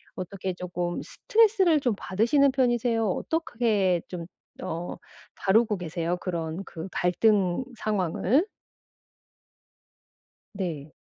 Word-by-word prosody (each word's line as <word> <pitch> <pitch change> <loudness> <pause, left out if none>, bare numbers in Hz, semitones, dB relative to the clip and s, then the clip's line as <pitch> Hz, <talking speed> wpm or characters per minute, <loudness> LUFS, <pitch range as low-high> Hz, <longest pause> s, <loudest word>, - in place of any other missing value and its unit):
어떻게 185 0 -4
쪼끔 175 -1 -3
스트레스를 410 -8 +3
좀 250 -6 +1
받으시는 265 +10 +3
편이세요? 240 -3 +1
어떻게 215 - 0
좀 175 -2 -5 0.4
어 170 +2 -4 0.4
다루고 210 +1 +3
계세요? 170 0 -2
그런 170 0 -4
그 165 +3 -7
갈등 185 +3 +2
상황을? 210 - +1 2.1
네. 160 -7 -4
190 Hz, 210 characters per minute, -27 LUFS, 175-240 Hz, 2.1 s, 스트레스를